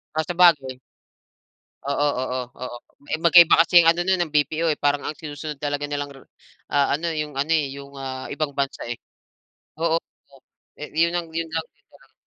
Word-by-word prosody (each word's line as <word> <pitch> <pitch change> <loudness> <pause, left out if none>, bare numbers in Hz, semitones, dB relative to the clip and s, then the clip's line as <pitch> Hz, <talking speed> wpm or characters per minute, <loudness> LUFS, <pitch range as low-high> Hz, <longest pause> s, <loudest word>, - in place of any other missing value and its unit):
Ah, 160 - +1
sabagay. 160 -7 +3 1.1
Oo, 140 +1 +1
oo, 130 0 -2 0.2
oo. 125 -1 -6 0.3
Eh, 155 - +1
magkaiba 170 -1 +7
kasi 170 - -1
ano 170 +1 +2
no'n 190 -1 +2
ng 160 - -9
BPO 155 +2 +1
eh, 150 - -4
parang 145 0 +2
ang 155 - -4
sinusunod 150 -1 -7
talaga 145 0 -2
nilang 145 -1 -4
rou 135 - -15 0.5
ah, 140 -1 +3
ano 165 +4 -3
yung 150 -1 -6
ano, 145 +4 -1
eh, 150 - -1
yung, 140 0 -10
ah, 130 -1 -5
ibang 145 0 -2
bansa, 140 -1 -2
eh. - - -3 0.9
Oo, 165 0 +2
oo, 140 -4 -10 0.4
eh 150 - -7
yun 170 0 +3
lang, 175 -1 -2
yun 165 0 -3
lang, 160 0 -3 0.2
yun - - -46
na - - -20
lang. - - -30
150 Hz, 190 wpm, -23 LUFS, 140-165 Hz, 1.1 s, magkaiba